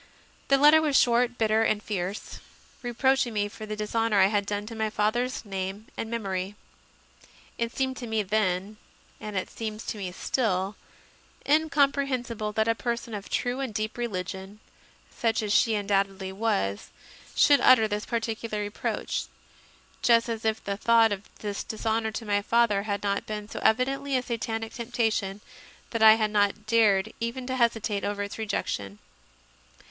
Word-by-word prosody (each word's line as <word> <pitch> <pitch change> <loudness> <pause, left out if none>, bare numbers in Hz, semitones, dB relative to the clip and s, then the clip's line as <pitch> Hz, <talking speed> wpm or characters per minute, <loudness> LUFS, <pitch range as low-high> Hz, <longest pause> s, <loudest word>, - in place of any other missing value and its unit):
The 275 - +5
letter 300 +3 +7
was 295 -3 +3
short, 245 0 +3
bitter, 220 0 +2
and 215 -2 +1
fierce, 195 -1 -4 0.4
reproaching 255 0 +1
me 205 -1 0
for 215 +1 -9
the 215 - -3
dishonour 215 0 +1
I 190 - +7
had 200 -1 +1
done 205 0 -2
to 230 - -8
my 220 -1 -1
father 215 +4 +1
s 255 -2 -6
name 195 +1 -4
and 225 - -4
memory. 195 -4 -3 1.0
It 230 0 -1
seemed 260 0 -2
to 240 - -6
me 220 -1 0
then 200 0 0 0.4
and 210 -2 -5
it 185 - -3
seems 220 -1 -5
to 215 - -4
me 185 -2 -4
still 195 -1 -1 0.7
incomprehensible 275 -7 +1
that 220 +1 +1
a 230 - +4
person 235 0 -3
of 205 -1 -6
true 245 +2 -1
and 265 -4 -2
deep 215 +1 -2
religion, 190 -3 -5 0.6
such 225 -2 0
as 210 -1 0
she 225 -1 +4
undoubtedly 195 -2 0
was, 105 - -1 0.5
should 285 -1 +5
utter 225 -4 +6
this 210 0 -3
particular 225 -2 -2
reproach; 205 0 -3 0.8
just 230 -1 +4
as 225 -1 -4
if 220 0 0
the 200 -1 -3
thought 230 0 +4
of 200 0 -5
this 205 -1 -4
dishonour 220 0 -1
to 225 - -5
my 205 -1 +1
father 225 -2 +2
had 200 0 -2
not 200 0 -1
been 210 -1 -5
so - - -6
evidently 270 +4 +2
a 250 - -2
Satanic 225 -2 -3
temptation 220 -4 -1 0.5
that 230 - -2
I 220 0 +9
had 215 -1 0
not 205 0 +1
dared 215 -4 +3
even 235 +2 -3
to 260 0 -2
hesitate 225 -4 +1
over 205 0 -2
its 200 +2 -7
rejection. 100 - -3
220 Hz, 165 wpm, -27 LUFS, 205-235 Hz, 1.0 s, I